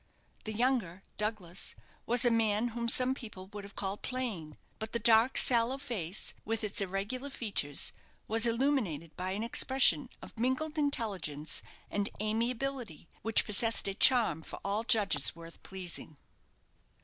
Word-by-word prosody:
The 215 - -3
younger, 220 -6 0
Douglas, 210 -5 -2 0.3
was 245 +1 +4
a 240 - +4
man 225 0 +1
whom 235 0 -3
some 255 +2 +3
people 215 -8 -9
would 205 -1 -7
have 200 0 -12
called 195 +1 -4
plain. 220 - -4 0.2
But 220 0 -6
the - - +1
dark 230 +2 +5
sallow 240 +1 +5
face, 215 - -2
with 225 +1 -2
its 210 0 +2
irregular 200 +8 -3
features, 200 - -1 0.3
was 225 +2 +2
illuminated 230 - -1
by 185 +1 -3
an 210 +3 -3
expression 260 +2 +4
of - - -12
mingled 260 +6 -1
intelligence 195 - -2 0.3
and 205 -1 0
amiability, 230 - -2
which 225 0 +2
possessed 225 +1 +3
a 195 - -1
charm 220 - +4
for - - -8
all 205 +3 -1
judges 220 -5 +2
worth 165 0 -12
pleasing. 180 -5 -8
220 Hz, 145 wpm, -31 LUFS, 195-245 Hz, 0.3 s, dark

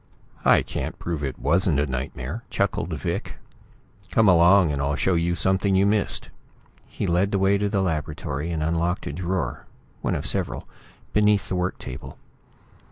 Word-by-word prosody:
"I - - +6
can - - -4
prove 80 -4 -4
it 65 -2 -3
wasn't 80 0 +2
a 70 - +2
nightmare," 65 - -4
chuckled 95 -3 -1
Vic. 75 -4 -3 0.7
"Come 110 -2 +3
along, 90 -1 +6
and 70 -1 -2
I'll 70 +1 0
show 95 +4 +1
you 85 +1 +1
something 95 +3 +2
you 95 +1 +4
missed." 105 0 +1 0.6
He - - -4
led 90 +3 +2
the 100 - +1
way 95 +1 +3
to 105 0 0
the 100 -2 +1
laboratory, 75 -2 -3
and 80 -2 -1
unlocked 85 +2 0
a 70 - -4
drawer, 90 +2 -3 0.3
one - - 0
of - - -3
several, - - -2 0.5
beneath 105 -1 +3
the - - -1
work 90 +1 -1
table. 65 -2 -8
85 Hz, 165 wpm, -24 LUFS, 75-95 Hz, 0.7 s, I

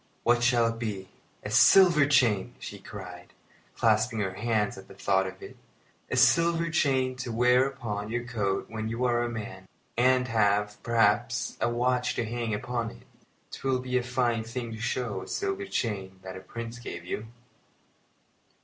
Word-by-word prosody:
"What 120 0 +3
shall 120 -1 +4
it 115 0 -2
be? 100 -5 -4 0.3
a - - -5
silver 170 -7 +6
chain!" 120 -6 +2
she 100 - -8
cried, 90 -3 -10 0.4
clasping 110 +1 +2
her 95 -2 -2
hands 110 0 0
at 95 - -12
the - - -14
thought 95 -1 +1
of 95 0 -9
it. - - -10 0.5
"A - - -1
silver 170 0 +3
chain 130 -5 +1
to 125 -2 -4
wear 125 +3 +4
upon 110 -6 -5
your 120 +1 -2
coat 105 -5 -2
when 110 -1 -4
you 115 +3 -1
are 120 -1 +2
a 120 - -1
man, 105 -5 -7 0.3
and 125 +1 +3
have, 105 -2 +1
perhaps, 115 +2 +1
a - - +2
watch 125 +1 0
to 120 - -1
hang 115 0 -3
upon 120 +2 -2
it! - - -14 0.5
'Twill 135 -1 -1
be 125 0 -4
a 125 - +3
fine 120 -2 0
thing 115 +1 -5
to 110 - -7
show 115 -5 -2
a - - -9
silver 395 0 -2
chain 95 - -3
that 95 -1 -7
a - - -7
Prince 115 +5 -7
gave 85 -7 -7
you!" 105 +4 -4
115 Hz, 175 wpm, -28 LUFS, 105-125 Hz, 0.5 s, silver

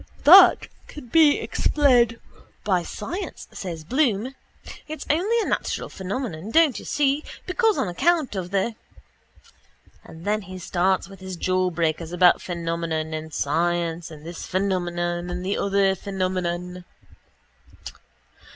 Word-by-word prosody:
—That 370 +4 +8 0.2
can 290 -5 -11
be 305 +1 +5
explained 245 -6 +2 0.4
by 185 -4 +1
science, 345 - -6
says 170 -4 -6
Bloom. 250 - 0 0.5
It's 310 0 -7
only 400 +10 +1
a - - -2
natural - - -2
phenomenon, 195 -2 -5
don't 315 0 +3
you - - -12
see, 290 +1 +1 0.2
because 440 +3 +1
on - - 0
account 305 - +1
of 180 -2 -4
the... 200 +4 0 1.3
And 160 +1 -13
then 210 +1 0
he 185 -1 -9
starts 185 +2 0
with 195 -1 -13
his 190 -1 -7
jawbreakers 170 -3 -1
about 175 0 +5
phenomenon 165 -2 -3
and 155 0 -5
science 170 +3 -1
and 155 -1 -12
this 170 0 -7
phenomenon 175 -2 -1
and 180 +1 -5
the 195 - -1
other 200 -1 +2
phenomenon. 180 -2 -3
185 Hz, 125 wpm, -24 LUFS, 175-245 Hz, 1.3 s, That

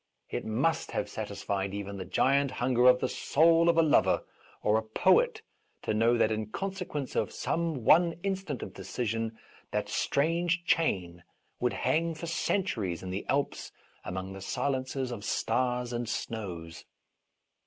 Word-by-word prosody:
It - - -3
must 130 +10 0
have - - -1
satisfied 100 0 -3
even 100 0 -5
the 95 - -5
giant 140 +1 +2
hunger 125 0 +2
of 125 0 +6
the - - +1
soul 165 +5 +4
of 170 - +3
a 165 - +6
lover 155 - +3 0.4
or 105 +1 +3
a - - -3
poet 440 - +2 0.4
to - - 0
know 115 +3 +3
that 110 -1 +3
in 110 -1 -2
consequence 180 - -4
of - - 0
some 160 -8 -2
one 170 +4 +6
instant 190 -8 -2
of - - -8
decision 115 -1 -3 0.3
that - - -2
strange 170 +4 +1
chain 90 - 0 0.4
would 125 - +1
hang 160 +6 0
for 160 - -6
centuries 115 - -1
in 90 - -5
the 95 +2 -4
Alps 140 +1 -1 0.3
among 95 +1 -5
the 95 - -9
silences 130 +3 -2
of 110 -4 -6
stars 125 +1 0
and 120 -1 -2
snows. 85 -10 -5
125 Hz, 155 wpm, -30 LUFS, 110-165 Hz, 0.4 s, of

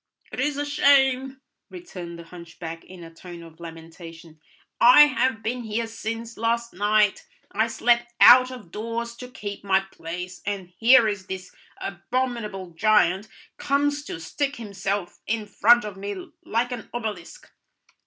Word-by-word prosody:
"It - - -7
is 295 -1 0
a 290 - -1
shame," 270 -2 +3 0.3
returned 180 - -9
the 170 - -10
hunchback 165 -1 -9
in 180 -2 -12
a 165 0 -12
tone 170 0 -11
of 165 -1 -15
lamentation; 165 -1 -12 0.4
"I 250 +5 +8
have 260 -5 +3
been 245 +2 -2
here 225 0 -2
since 225 0 -6
last 235 +1 -1
night, 210 +2 +1 0.2
I 220 +2 +1
slept 235 +1 +1
out 255 +1 +8
of 245 -10 -11
doors 230 +3 -4
to 250 - -8
keep 205 -5 -7
my 190 -1 +3
place, 180 -1 -8
and 195 -3 -5
here 230 0 +6
is 200 -3 -4
this 190 -1 -7 0.3
abominable 210 -1 -4
giant 200 +1 +2 0.3
comes 285 +1 0
to 165 - -6
stick 280 - -3
himself 200 -4 -4
in 220 -1 -1
front 235 +3 +4
of 205 -2 -7
me 200 -1 -7
like 240 +3 -1
an 245 -2 -7
obelisk." 215 -7 -6
215 Hz, 150 wpm, -24 LUFS, 180-240 Hz, 0.4 s, I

